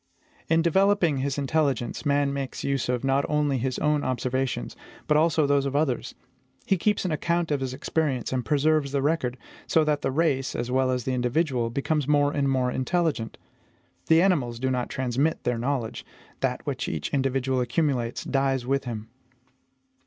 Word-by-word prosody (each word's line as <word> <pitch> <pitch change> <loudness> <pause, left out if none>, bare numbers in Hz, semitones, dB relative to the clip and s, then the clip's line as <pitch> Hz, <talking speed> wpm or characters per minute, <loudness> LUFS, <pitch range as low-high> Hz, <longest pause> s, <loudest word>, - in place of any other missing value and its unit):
In 165 0 +3
developing 190 -2 +3
his 135 +1 -2
intelligence, 140 -2 0
man 140 -1 +2
makes 135 -2 -4
use 135 -3 -1
of 125 0 0
not 135 +1 +2
only 145 -3 +1
his 130 +1 -2
own 150 -1 +1
observations, 130 - -2 0.3
but 150 - +2
also 155 0 +3
those 140 -1 +2
of 140 - -4
others. 145 -4 0 0.5
He 195 - +3
keeps 205 +2 0
an 180 - 0
account 170 +2 0
of 145 - +1
his 130 -1 -3
experience, 135 -2 -1
and 125 -1 0
preserves 150 0 +1
the 140 - +1
record; 140 -5 0 0.3
so 160 - +3
that 150 -1 0
the - - 0
race, 135 -2 0
as 120 +1 -3
well 130 0 +2
as 125 -1 -1
the 130 - -1
individual, 125 -1 0
becomes 140 +3 -1
more 145 -1 +3
and 140 -2 0
more 130 -2 +1
intelligent. 130 -3 -1 0.7
The 165 +1 +5
animals 135 -12 +1
do 130 +2 -1
not 125 -1 -1
transmit 130 +5 -1
their 120 -2 0
knowledge; 125 -2 -2 0.4
that - - -2
which - - -3
each 80 - -4
individual 135 -1 +1
accumulates 125 -2 -1
dies 135 -2 0
with 135 +1 0
him. 110 -3 -5
135 Hz, 175 wpm, -26 LUFS, 130-150 Hz, 0.7 s, The